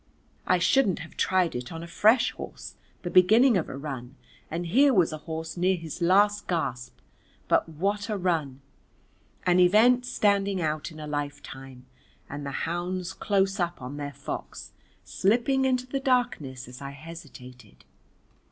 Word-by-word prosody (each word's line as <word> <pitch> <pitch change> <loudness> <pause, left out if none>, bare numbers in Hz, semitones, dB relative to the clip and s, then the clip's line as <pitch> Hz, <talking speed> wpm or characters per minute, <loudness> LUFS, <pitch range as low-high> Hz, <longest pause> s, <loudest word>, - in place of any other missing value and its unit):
I 185 - +4
shouldn't 195 +2 +3
have 165 -1 -10
tried 185 -2 +1
it 125 0 -5
on 165 0 -6
a - - -8
fresh 220 +7 +3
horse - - -9 0.3
the 175 - -4
beginning 220 +7 +6
of 175 - 0
a - - -6
run, 135 -3 -7 0.3
and 170 +2 -3
here 265 +9 +4
was 175 -4 +3
a 155 - -5
horse 160 0 -4
near 185 +2 +2
his 165 0 -8
last 205 +4 +3
gasp. 130 -8 -3 0.5
But - - +2
what 200 +7 -2
a 210 - -1
run! 160 -8 -1 0.8
an 180 0 +4
event 230 +7 +5
standing 200 -5 +1
out 155 -2 -2
in 155 - -11
a 155 - -6
lifetime, 135 -3 -6 0.4
and 145 0 -6
the 140 - -4 0.2
hounds 180 +2 -3
close 195 0 0
up 175 -1 -1
on 130 +2 -7
their 145 -1 -5
fox, 140 +1 -7 0.3
slipping 245 +7 +1
into 255 -1 +1
the 270 +2 -3
darkness 240 - -1
as 125 +1 -11
I 140 - -5
hesitated. 135 - -12
175 Hz, 160 wpm, -27 LUFS, 145-205 Hz, 0.8 s, beginning